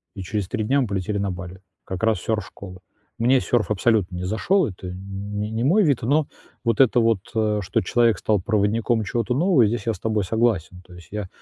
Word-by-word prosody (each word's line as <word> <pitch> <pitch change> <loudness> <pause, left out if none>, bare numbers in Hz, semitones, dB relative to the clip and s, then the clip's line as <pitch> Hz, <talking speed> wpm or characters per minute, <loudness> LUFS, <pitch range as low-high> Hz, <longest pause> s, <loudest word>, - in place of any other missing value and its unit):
И 100 - -6
через 100 0 -3
3 110 +1 -2
дня 135 +6 +2
мы 125 - -1
полетели 100 +1 -2
на 100 -1 -1
Бали. 90 +1 -8 0.2
Как 95 +1 -6
раз 110 -4 +2
сёрф-школа. 100 -3 -5 0.4
Мне 125 +3 +4
сёрф 120 -3 0
абсолютно 105 -3 +1
не 90 - -4
зашёл. 140 - +1
Это 95 -3 -8
н 90 +1 -7 0.4
не 105 +1 -3
не 110 +1 -2
мой 185 +11 +4
вид. 145 -8 +2
Но 145 +5 +2 0.4
вот 115 -2 0
это 125 -1 +4
вот, 115 -3 +2 0.2
э, 105 -1 +1
что 95 - 0
человек 115 +1 +2
стал 105 -3 +1
проводником 110 +3 +1
чего-то 115 +4 -1
нового, 160 - +4
здесь 110 -1 -3
я 115 - +2
с - - -10
тобой 110 -2 0
согласен. 95 -4 0
То 90 - -15
есть 85 -3 -14
я 105 -2 -4
110 Hz, 215 wpm, -23 LUFS, 95-120 Hz, 0.4 s, Мне